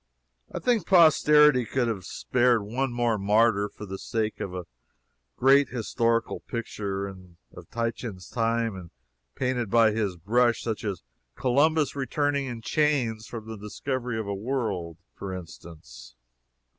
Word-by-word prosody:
I - - -5
think 235 -8 +1
posterity 150 -6 +6
could 120 +1 -1
have 100 -6 -3
spared 120 +2 +1
one 125 +5 -2
more 120 -3 0
martyr 105 0 +3
for 105 - -10
the 95 -1 -7
sake 110 -2 -2
of 95 - -4
a 90 -1 -6 0.7
great 135 +2 +5
historical 115 -1 0
picture 100 -4 -4
of 90 -2 -14
Titian's 115 -5 -4
time 115 -2 0
and 90 -3 -9 0.5
painted 125 -4 -1
by 115 0 +5
his 105 -4 -1
brush 120 +7 +2
such 110 -2 -3
as 100 - -4 0.3
Columbus 145 +4 +2
returning 140 +1 -1
in 120 -2 -6
chains 125 -8 0
from 110 -2 -8
the 110 0 -6
discovery 125 +3 -4
of 110 - -3
a 100 - -3
world, 100 - -3 0.2
for 95 -2 -6
instance. 75 -9 -11
115 Hz, 140 wpm, -26 LUFS, 100-125 Hz, 0.7 s, posterity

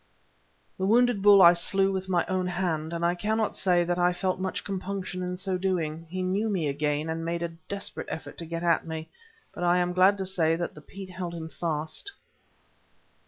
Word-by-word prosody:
The 190 - 0
wounded 240 -1 +4
bull 200 -1 +8
I 170 0 +9
slew 195 +3 +2
with 190 0 -3
my 175 -2 +2
own 185 -1 -1
hand, 170 -4 -1
and 170 0 -1
I 175 - +3
cannot 215 +4 -1
say 180 -2 +2
that 175 +1 -1
I 180 0 +3
felt 185 +1 -1
much 190 0 -3
compunction 190 -1 -4
in 180 0 -3
so 185 0 -2
doing. 165 -4 -2
He 185 +2 -3
knew 200 +4 0
me 180 -7 0
again, 150 +2 -1
and 165 0 -3
made 170 +1 -2
a 170 - -1 0.2
desperate 200 0 -5
effort 145 -2 -7
to 165 - -5
get 165 +1 -4
at 170 -1 +3
me, 160 0 -5 0.4
but - - -5
I 175 0 +4
am 180 0 +1
glad 190 +3 +5
to 190 - -3
say 165 -4 +2
that 170 +1 -3
the 150 - -12
peat 190 +4 -10
held 180 -2 -5
him 160 -1 -6
fast. 160 - -4
180 Hz, 210 wpm, -27 LUFS, 165-190 Hz, 0.4 s, I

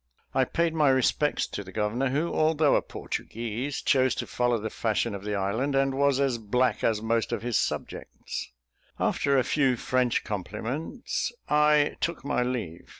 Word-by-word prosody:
I - - +3
paid 170 -1 0
my 155 -3 +3
respects 135 +3 +2
to 100 - -5
the 95 - -11
governor, 110 +6 0
who, 150 +6 -1
although 155 -1 +3
a - - +3
Portuguese, 120 +5 -4
chose 130 -1 +3
to - - -3
follow 125 -1 +1
the 110 0 -4
fashion 110 -2 0
of 100 -1 -6
the 105 0 -2
island, 110 +9 -1
and 135 0 +2
was 140 0 +2
as 135 -4 +1
black 125 +4 0
as 110 -1 +1
most 115 0 0
of - - -2
his 120 -2 -1
subjects. - - -4 0.5
After 140 -1 +2
a 130 - +4
few 135 -3 +2
French 125 0 0
compliments, 115 - -3 0.2
I 150 0 +3
took 170 -4 -2
my 140 - +1
leave. 120 -10 -3
130 Hz, 170 wpm, -27 LUFS, 110-140 Hz, 0.5 s, a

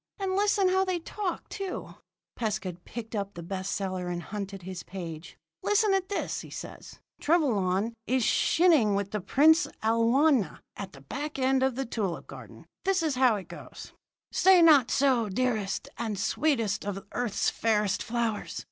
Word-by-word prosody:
And 385 -1 -2
listen 400 -1 +3
how 380 +1 +3
they 370 -2 -1
talk, 365 +2 -4
too!" 390 -2 -5 0.4
Pescud 200 -6 -3
picked 225 -1 -7
up 200 -1 -3
the 170 - -7
best 190 +2 -4
seller 185 -2 -3
and 175 -1 -3
hunted 195 -2 -6
his 185 -1 -6
page. 170 -4 -8 0.2
"Listen 415 -1 +3
at 385 -1 0
this," 405 - -2
said - - -8
he. - - -16
"Trevelyan 225 - +2
is 255 -1 +2
chinning 295 - +4
with 200 0 -2
the 210 - -2
Princess 315 - +4
Alwyna 230 - +3
at 195 -2 -7
the 135 - -13
back 285 - -5
end 265 0 +2
of 265 -2 +1
the 270 +1 -2
tulip 205 -7 -3
garden. - - -12 0.2
This 380 -3 +1
is 310 -3 +1
how 255 -3 +4
it 190 -4 -6
goes: 175 - -11 0.4
"'Say 375 -2 +6
not 290 -7 +6
so, 255 -6 +2
dearest 215 -2 -1
and 220 -3 -2
sweetest 225 0 0
of 195 -1 -5
earth's 245 -4 0
fairest 210 -3 +1
flowers. 230 -2 -2
230 Hz, 165 wpm, -28 LUFS, 195-310 Hz, 0.4 s, Say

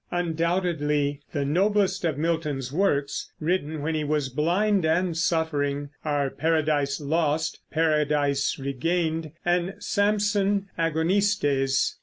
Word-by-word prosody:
Undoubtedly 165 -4 0
the 145 -2 -1
noblest 195 +5 +1
of 155 -4 0
Milton's 150 -5 -2
works, 145 -6 0
written 155 -2 -1
when 160 +2 -1
he 155 -1 -1
was 150 -2 0
blind 180 +8 +1
and 165 +2 +1
suffering, 145 -4 0
are 145 -3 0
Paradise 155 -3 0
Lost, 155 +1 0
Paradise 150 -3 +1
Regained, 160 +4 -1
and 175 +2 +1
Samson 205 -1 +1
Agonistes. 160 -5 +1
160 Hz, 105 wpm, -25 LUFS, 145-175 Hz, -, noblest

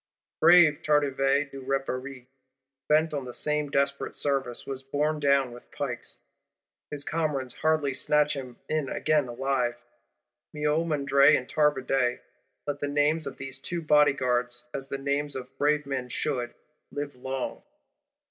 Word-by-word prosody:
Brave 165 -2 +6
Tardivet 140 -1 +2
du 135 - -8
Repaire, 135 -1 -3 0.6
bent 155 +1 +3
on 140 -3 -3
the 125 - -6
same 150 +1 -1
desperate 140 0 0
service, 135 -4 -1
was 135 -1 -5
borne 150 +3 -1
down 140 -3 +3
with 120 0 -13
pikes; - - -5 0.7
his 145 -1 -2
comrades 145 -6 -1
hardly 155 -3 +2
snatched 150 +2 +2
him 130 -3 -7
in 155 -4 -1
again 150 -4 +1
alive. 125 0 -1 0.8
Miomandre 150 -2 +3
and 125 - -6
Tardivet: 135 -4 +1 0.4
let 145 -1 -3
the 145 - -2
names 145 +2 +1
of - - -7
these 135 0 -7
two 170 +4 -4
Bodyguards, 125 -5 +2
as 135 -1 -5
the 140 - -2
names 140 +1 -1
of 130 0 -7
brave 150 0 +2
men 130 -2 -3
should, 125 -3 -2 0.4
live 145 -1 -5
long. 130 +1 -4
140 Hz, 140 wpm, -27 LUFS, 130-150 Hz, 0.8 s, Brave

